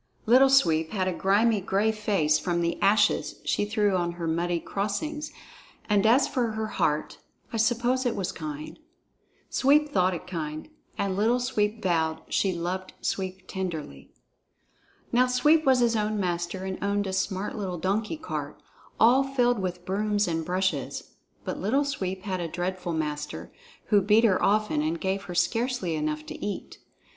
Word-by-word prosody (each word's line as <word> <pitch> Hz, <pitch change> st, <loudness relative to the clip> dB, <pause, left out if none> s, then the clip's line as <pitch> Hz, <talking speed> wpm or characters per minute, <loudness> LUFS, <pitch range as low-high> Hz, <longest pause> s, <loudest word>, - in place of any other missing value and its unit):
Little 255 Hz, +4 st, +6 dB
Sweep 165 Hz, -11 st, +3 dB
had 190 Hz, -3 st, 0 dB
a 185 Hz, -, 0 dB
grimy, 205 Hz, +4 st, +2 dB
gray 200 Hz, +4 st, +1 dB
face 195 Hz, -8 st, +1 dB
from 170 Hz, +2 st, -1 dB
the 170 Hz, 0 st, -2 dB
ashes 205 Hz, +1 st, +2 dB
she -, -, +1 dB
threw 205 Hz, -2 st, +1 dB
on 175 Hz, -1 st, 0 dB
her 170 Hz, -1 st, -5 dB
muddy 170 Hz, +1 st, 0 dB
crossings, 210 Hz, -, -3 dB, 0.6 s
and 210 Hz, 0 st, +3 dB
as 250 Hz, +5 st, +5 dB
for 235 Hz, -4 st, -1 dB
her 220 Hz, 0 st, -2 dB
heart, 160 Hz, -7 st, -1 dB, 0.3 s
I -, -, -1 dB
suppose 240 Hz, +3 st, +1 dB
it 245 Hz, -, 0 dB
was 190 Hz, -, -2 dB
kind. 155 Hz, -, -7 dB, 0.7 s
Sweep 295 Hz, +3 st, +4 dB
thought 185 Hz, -9 st, +2 dB
it 175 Hz, -, -8 dB
kind, 155 Hz, -, -5 dB, 0.3 s
and 195 Hz, -1 st, -1 dB
Little 225 Hz, +5 st, +2 dB
Sweep 220 Hz, -3 st, -1 dB
vowed 160 Hz, -3 st, 0 dB
she 195 Hz, -, +1 dB
loved 185 Hz, +2 st, -4 dB
Sweep 190 Hz, -1 st, -3 dB
tenderly. 160 Hz, -, -5 dB, 1.0 s
Now 250 Hz, +1 st, +4 dB
Sweep 300 Hz, +5 st, +3 dB
was 260 Hz, -2 st, +5 dB
his 235 Hz, -1 st, +3 dB
own 215 Hz, 0 st, 0 dB
master 175 Hz, 0 st, -2 dB
and 190 Hz, 0 st, -5 dB
owned 205 Hz, 0 st, 0 dB
a 190 Hz, -, -3 dB
smart 190 Hz, +1 st, -2 dB
little 190 Hz, -4 st, -3 dB
donkey 210 Hz, -, -1 dB
cart, 320 Hz, -, -5 dB, 0.4 s
all 250 Hz, +4 st, +6 dB
filled 245 Hz, -4 st, +1 dB
with 180 Hz, -2 st, -4 dB
brooms 205 Hz, +1 st, 0 dB
and 165 Hz, -1 st, -1 dB
brushes; 185 Hz, +3 st, -2 dB, 0.3 s
but -, -, -4 dB
Little 270 Hz, +8 st, +1 dB
Sweep 190 Hz, -9 st, -3 dB
had 185 Hz, -3 st, -2 dB
a 170 Hz, -, -2 dB
dreadful 180 Hz, +1 st, -3 dB
master, 150 Hz, -2 st, -4 dB, 0.4 s
who 205 Hz, -2 st, +5 dB
beat 210 Hz, +4 st, +4 dB
her 205 Hz, -5 st, +3 dB
often 210 Hz, -7 st, +2 dB
and 160 Hz, +2 st, -1 dB
gave 195 Hz, +1 st, -2 dB
her 175 Hz, -, -7 dB
scarcely 230 Hz, -5 st, 0 dB
enough 155 Hz, 0 st, -2 dB
to -, -, -8 dB
eat. 205 Hz, -, -5 dB
195 Hz, 165 wpm, -27 LUFS, 175-225 Hz, 1.0 s, Little